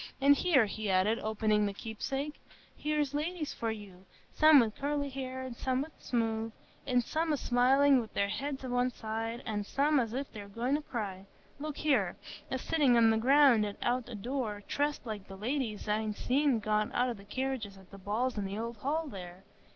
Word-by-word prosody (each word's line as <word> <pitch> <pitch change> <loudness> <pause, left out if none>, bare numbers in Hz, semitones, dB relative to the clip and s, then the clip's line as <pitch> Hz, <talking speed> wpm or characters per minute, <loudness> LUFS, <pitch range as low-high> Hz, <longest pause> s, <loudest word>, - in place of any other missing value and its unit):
An' 280 +1 +6
here," 285 -6 +4
he 215 0 -4
added, 190 +4 +3
opening 215 -1 +1
the 200 - -4
"Keepsake,"—"here's 285 +5 -4
ladies 305 +1 -2
for 230 - -2
you, 200 -4 -8 0.3
some 310 -2 +7
wi' 230 -3 +2
curly 285 +3 -2
hair 260 -1 -5
and 255 -2 -6
some 260 +1 0
wi' 310 - -9
smooth, 225 -2 -1 0.4
an' 250 -2 +3
some 320 +6 -1
a 295 - +2
smiling 265 +3 +4
wi' 220 - -8
their 200 0 +1
heads 270 +4 -3
o' - - -4
one 245 +1 +2
side, 225 +1 -4
an' 210 -2 -2
some 285 +7 +2
as 230 -3 -1
if 270 +2 -3
they 210 - -8
were 200 - -10
goin' 235 +6 -2
to 295 - +1
cry,—look 230 +6 -7
here,—a 260 - -1
sittin' 280 -2 +3
on 225 -1 +6
the 220 - +2
ground 265 -1 +5 0.2
out 245 0 0
o' 240 - -6
door, 215 -2 -3
dressed 290 -1 -1
like 210 -4 -6
the 195 - -9
ladies 225 -1 -2
I'n 215 0 0
seen 270 +2 +2
get 215 -1 0
out 250 +1 +2
o' - - -1
the 200 -3 -13
carriages 235 -2 -3
at 190 -1 -17
the 200 - -11
balls 215 +5 -1
in 200 - -2
th' 195 +1 -5
Old 230 +1 -4
Hall 300 +8 -1
there. 180 -5 -9
240 Hz, 195 wpm, -31 LUFS, 215-275 Hz, 0.4 s, some